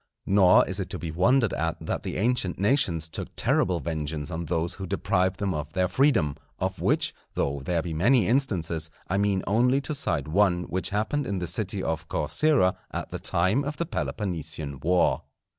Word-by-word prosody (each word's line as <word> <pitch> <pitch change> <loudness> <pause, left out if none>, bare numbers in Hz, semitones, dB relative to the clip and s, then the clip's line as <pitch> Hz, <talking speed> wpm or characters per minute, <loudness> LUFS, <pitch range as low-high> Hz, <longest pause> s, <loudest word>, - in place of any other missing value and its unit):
Nor 95 -2 +5
is - - -3
it - - -3
to - - -4
be 85 - -5
wondered 115 - +3
at 80 +1 -1
that 80 - -3
the - - -4
ancient 110 -4 0
nations 95 - +1
took 80 - -5
terrible 90 -2 +2
vengeance 75 +1 -4
on 85 +1 -3
those 85 +2 -1
who 95 +1 -6
deprived 95 +2 0
them 100 -2 0
of 75 -1 -5
their 90 0 +2
freedom; 100 - +2 0.2
of - - -3
which, - - +2 0.2
though 70 0 -1
there 85 +3 -1
be 85 - -4
many 110 +7 +3
instances, 85 - 0 0.2
I 95 +2 0
mean 100 -2 +1
only 125 +6 +3
to 150 - -2
cite 75 - -1
one 90 +1 +2
which 95 +1 -1
happened 110 +9 -1
in 100 - -2
the 90 - -2
city 100 +1 -2
of 80 0 -2
Corcyra 95 - +2
at - - -5
the - - -5
time 95 +11 +1
of 145 +1 -4
the 170 - -1
Peloponnesian 80 - -4
war. 90 +6 +2
90 Hz, 190 wpm, -26 LUFS, 80-105 Hz, 0.2 s, Nor